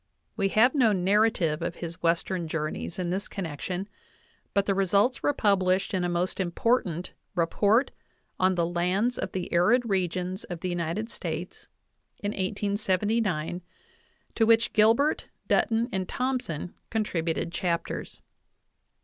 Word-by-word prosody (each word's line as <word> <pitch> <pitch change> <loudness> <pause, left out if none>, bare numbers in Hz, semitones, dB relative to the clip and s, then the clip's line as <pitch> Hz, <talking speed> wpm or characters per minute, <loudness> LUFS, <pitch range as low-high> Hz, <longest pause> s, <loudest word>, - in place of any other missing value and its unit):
We 195 - +1
have 225 +6 +4
no 245 -7 +4
narrative 190 -4 +2
of 170 0 -3
his 170 +1 -7
Western 170 +1 0
journeys 155 +1 -3
in 180 -2 -2
this 195 +3 -2
connection, 180 +1 -4 0.6
but 200 -1 +2
the 200 - +2
results 200 +6 +2
were - - +3
published 195 -4 +2
in 185 -2 +1
a 175 - 0
most 175 +2 -1
important 180 -1 0 0.2
"Report 205 +8 +2 0.5
on 185 0 +3
the 170 -1 +1
Lands 180 +8 0
of - - -3
the 185 -2 -4
Arid 230 +8 +4
Regions 185 -1 -1
of 175 -2 -7
the 185 - -2
United 175 +6 -2
States" 165 +1 -5 0.5
in 205 - -3
1879, 200 -3 0 0.7
to 225 - +3
which 230 0 +4
Gilbert, 230 +8 +3 0.2
Dutton, 230 +1 +2
and 190 -1 -2
Thompson 250 - -2 0.2
contributed 170 -7 -1
chapters. 170 -1 -3
185 Hz, 130 wpm, -27 LUFS, 175-215 Hz, 0.7 s, have